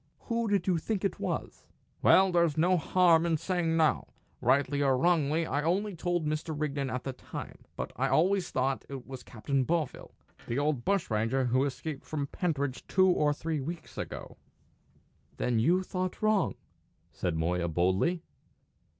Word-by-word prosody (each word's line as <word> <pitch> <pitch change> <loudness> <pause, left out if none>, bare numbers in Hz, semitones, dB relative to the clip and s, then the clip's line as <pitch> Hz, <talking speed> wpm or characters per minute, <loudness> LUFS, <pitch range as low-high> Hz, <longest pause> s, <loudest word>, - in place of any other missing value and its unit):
"Who 230 -1 -1
did 200 -2 +1
you 180 -3 +2
think 205 +3 -2
it 195 - -1
was?" - - -4 0.3
"Well, 190 0 +6
there's 170 -4 +2
no 180 +4 +4
harm 170 -1 +4
in 165 -2 +1
saying 170 -1 0
now. 155 -2 +2 0.3
Rightly 140 +3 +2
or 135 -2 +3
wrongly, 165 0 +2
I 145 -1 -1
only 190 +5 0
told 175 -1 -1
Mr. 155 0 -2
Rigden 140 -3 -1
at 125 -1 -3
the 135 - -4
time. 125 - -8 0.2
But - - -5
I 135 +3 +1
always 175 +7 +2
thought 130 +1 0
it 135 -3 -7
was 130 -1 -8
Captain 130 +5 -2
Bovill, 160 0 -2 0.3
the 120 - -2
old 145 -3 0
bushranger 130 - +1
who 130 +3 +2
escaped 140 +1 -5
from 145 -2 -3
Pentridge 145 -4 -2
two 185 0 +4
or 150 -4 +3
three 155 0 -2
weeks 165 +4 -7
ago." - - -6 1.0
"Then 120 -2 +1
you 175 +11 +3
thought 185 +2 -4
wrong," 215 -2 +2 0.6
said 85 +2 -2
Moya, 85 +2 0
boldly. 95 - +1
155 Hz, 160 wpm, -30 LUFS, 130-175 Hz, 1.0 s, Well